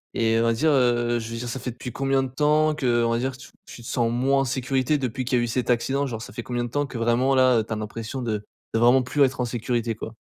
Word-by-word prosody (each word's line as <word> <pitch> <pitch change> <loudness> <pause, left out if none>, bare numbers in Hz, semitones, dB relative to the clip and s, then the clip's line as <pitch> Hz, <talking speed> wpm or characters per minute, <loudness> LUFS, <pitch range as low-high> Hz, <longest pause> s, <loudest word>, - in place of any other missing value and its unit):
et 115 -1 +2
heu, - - +2
on 115 - +2
va 115 - +3
dire, 155 +7 +2
heu, 120 -3 +2
je 115 0 -7
veux 115 - -4
dire, 120 - -5
ça 130 +2 -4
fait - - -5
depuis 125 +1 -8
combien 135 0 +1
de 130 - -4
temps, 150 +3 +2
que, 120 -5 +1
on 115 - +1
va 115 - +1
dire, 130 +1 -3
tu 125 -2 -13 0.2
tu 120 - -11
te 115 - -9
sens 120 -1 0
moins 135 +3 +2
en - - +1
sécurité, 130 +2 0
depuis 130 -1 -3
qu'il 125 0 +1
y - - +2
a - - 0
eu - - -1
cet 125 +2 -2
accident? 135 +4 +1
Genre, 115 -3 -5
ça - - -9
fait 120 - -5
combien 120 -1 -2
de 120 - -4
temps 145 +3 -1
que 125 - -7
vraiment, 120 +4 +2
là, 130 -2 +5
heu, - - 0
tu 110 - -14
as - - -2
l'impression 110 +4 -5
de 105 -3 -2 0.3
de 115 - +2
vraiment 125 +2 +5
plus 140 +3 +2
être 130 -1 +1
en 125 - +1
sécurité, 120 -1 -2
quoi? 110 0 -7
125 Hz, 315 wpm, -24 LUFS, 115-135 Hz, 0.3 s, là